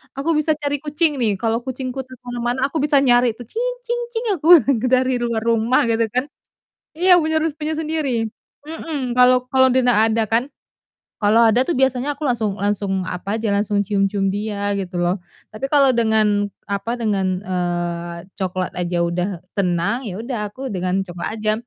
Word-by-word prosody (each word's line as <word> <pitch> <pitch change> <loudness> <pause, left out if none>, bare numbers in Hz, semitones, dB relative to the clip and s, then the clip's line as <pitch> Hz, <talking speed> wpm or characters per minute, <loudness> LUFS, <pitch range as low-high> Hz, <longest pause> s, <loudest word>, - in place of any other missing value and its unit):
aku 275 +4 -3
bisa 310 +1 +1
cari 290 0 -1
kucing 295 0 0
nih, 220 -4 +1
kalau 225 +3 -1
kucingku 260 0 -4
tuh 255 - -11
ke 250 - -31
mana-mana 240 +1 -2
aku - - -2
bisa 295 0 +2
nyari 245 -3 +4
tuh, 245 - -9
"Cing 470 +2 -2 0.2
cing 480 0 -2
cing," 455 +2 -2
aku 310 - -3 0.4
dari 255 0 +2
luar 235 -2 -1
rumah, 230 +2 +2
gitu 225 0 +1
kan. 255 +1 +1 0.7
Iya, 360 +1 +6
punya 315 0 0
rus 315 -2 -1
punya 310 +1 -3
sendiri. 300 -8 -1 0.4
Mhm, 295 -6 -4
kalau 250 0 +4
kalau 260 0 +5
dia 260 - +3
ndak 235 -4 +4
ada 225 0 +1
kan, 230 +3 +2 0.8
kalau 220 +3 +5
ada 225 +3 +4
tuh 335 - -1
biasanya 265 +2 +1
aku 305 - -3
langsung 220 -5 -1
langsung 195 -2 -1
apa 195 +5 -3
aja, 215 -2 0
langsung 205 0 0
cium-cium 195 -1 0
dia, 205 -1 -2
gitu 185 -2 -4
loh. 175 +2 0 0.3
Tapi 215 +5 -3
kalau 280 -2 +5
dengan 215 -3 +2 0.2
apa, 215 +4 -3
eee, - - -12
dengan 195 -2 +1 1.1
coklat 185 -2 -3
aja 175 0 -2
udah 175 +2 -1 0.3
tenang, 180 +5 0
ya 185 - -6
udah 235 +1 -4
aku 260 +6 -7
dengan 185 +1 0
coklat 175 +5 -5
aja. 215 0 +1
235 Hz, 180 wpm, -20 LUFS, 205-265 Hz, 1.1 s, Iya